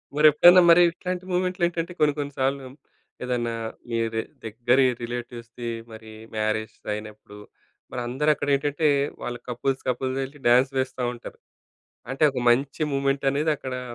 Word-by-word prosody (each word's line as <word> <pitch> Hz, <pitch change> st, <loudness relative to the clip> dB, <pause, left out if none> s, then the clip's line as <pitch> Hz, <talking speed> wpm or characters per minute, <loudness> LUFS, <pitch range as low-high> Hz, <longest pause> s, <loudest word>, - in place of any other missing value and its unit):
మరెప్పుడైనా 155 Hz, +4 st, +7 dB
మరి 170 Hz, +1 st, +8 dB
ఇట్లాంటి 180 Hz, +1 st, -5 dB
మూమెంట్‌లో 180 Hz, 0 st, -1 dB
ఏంటంటే 170 Hz, 0 st, -4 dB
కొన్ని 150 Hz, -1 st, +3 dB
కొన్ని 145 Hz, -1 st, -4 dB
సార్లు 135 Hz, 0 st, -1 dB, 0.6 s
ఏదన్నా 120 Hz, -2 st, -1 dB, 0.4 s
మీది 115 Hz, -1 st, -1 dB, 0.2 s
దగ్గరి 120 Hz, +4 st, +2 dB, 0.2 s
రిలేటివ్స్‌ది 120 Hz, 0 st, -6 dB, 0.2 s
మరి 110 Hz, 0 st, -11 dB, 0.2 s
మ్యారేస్ 110 Hz, 0 st, -2 dB, 0.2 s
అయినప్పుడు 105 Hz, -1 st, -9 dB, 0.5 s
మరి 125 Hz, -, -4 dB
అందరక్కడేంటంటే 145 Hz, +2 st, +1 dB, 0.3 s
వాళ్ళు 120 Hz, 0 st, -5 dB
కపుల్స్ 130 Hz, +2 st, -2 dB
కపుల్‌గా 130 Hz, +1 st, -1 dB
యెళ్లి 140 Hz, +2 st, -9 dB
డాన్స్ 125 Hz, +3 st, +4 dB
వేస్తా 130 Hz, -1 st, -2 dB
ఉంటారు. 120 Hz, -, -11 dB, 0.7 s
అంటే 135 Hz, +4 st, +1 dB
ఒక 130 Hz, -2 st, -4 dB
మంచి 135 Hz, +5 st, +1 dB
మూమెంటనేదక్కడా 135 Hz, 0 st, 0 dB
130 Hz, 120 wpm, -24 LUFS, 120-145 Hz, 0.7 s, మరి